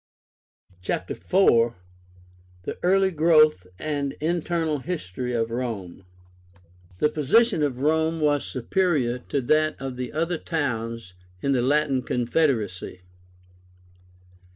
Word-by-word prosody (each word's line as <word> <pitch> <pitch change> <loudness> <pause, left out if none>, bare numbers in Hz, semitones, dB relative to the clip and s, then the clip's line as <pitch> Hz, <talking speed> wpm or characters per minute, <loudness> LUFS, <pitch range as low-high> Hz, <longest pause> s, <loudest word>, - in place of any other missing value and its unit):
CHAPTER 90 0 -3
IV. 120 -11 +3 0.9
THE - - -6
EARLY 190 +1 +3
GROWTH 155 - +4
AND 145 -2 -3
INTERNAL 165 -1 -1
HISTORY 125 - -4
OF 115 0 -1
ROME. 110 -7 -5 0.9
The 150 - +3
position 165 - +3
of 140 -4 0
Rome 160 +4 +1
was 145 -2 +2
superior 130 -3 0
to 140 - 0
that 155 +4 +1
of 135 -2 -5
the 125 -1 -4
other 165 +2 -1
towns 115 - -3 0.3
in 140 - +1
the 130 -3 +2
Latin 140 0 +2
Confederacy. 120 - -1
145 Hz, 105 wpm, -25 LUFS, 120-160 Hz, 0.9 s, GROWTH